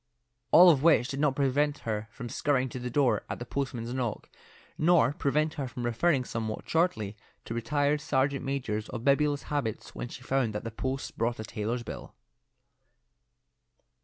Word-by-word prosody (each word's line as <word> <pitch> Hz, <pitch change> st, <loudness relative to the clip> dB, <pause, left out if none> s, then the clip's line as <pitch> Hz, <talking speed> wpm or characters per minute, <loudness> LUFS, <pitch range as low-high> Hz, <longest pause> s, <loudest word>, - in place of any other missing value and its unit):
All 175 Hz, +1 st, +9 dB
of 140 Hz, -5 st, +1 dB
which 150 Hz, -5 st, +4 dB
did 135 Hz, -, -4 dB
not 145 Hz, -2 st, +2 dB
prevent 145 Hz, +2 st, +1 dB
her 110 Hz, -1 st, -2 dB
from 120 Hz, +2 st, -8 dB
scurrying 130 Hz, +1 st, 0 dB
to 125 Hz, -, -6 dB
the 125 Hz, 0 st, -4 dB
door 135 Hz, 0 st, +2 dB
at -, -, -3 dB
the 120 Hz, -, -6 dB
postman's 125 Hz, -2 st, -3 dB
knock, 125 Hz, -4 st, -3 dB, 0.4 s
nor 155 Hz, -5 st, +4 dB
prevent 150 Hz, +3 st, 0 dB
her 135 Hz, -, -2 dB
from 120 Hz, -1 st, -5 dB
referring 130 Hz, +3 st, +2 dB
somewhat 110 Hz, -2 st, -4 dB
shortly 160 Hz, -, 0 dB, 0.3 s
to -, -, -5 dB
retired 145 Hz, +6 st, 0 dB
sergeant 140 Hz, -1 st, 0 dB
majors 125 Hz, -6 st, -2 dB
of 120 Hz, -2 st, -5 dB
bibulous 145 Hz, +1 st, +3 dB
habits 120 Hz, -7 st, -2 dB
when -, -, -5 dB
she -, -, -10 dB
found 130 Hz, -5 st, 0 dB
that 105 Hz, -, -3 dB
the 115 Hz, -, -5 dB
post 130 Hz, +4 st, -4 dB
brought 115 Hz, +1 st, 0 dB
a -, -, -3 dB
tailor's 115 Hz, +2 st, -3 dB
bill. -, -, -8 dB
130 Hz, 170 wpm, -29 LUFS, 115-145 Hz, 0.4 s, All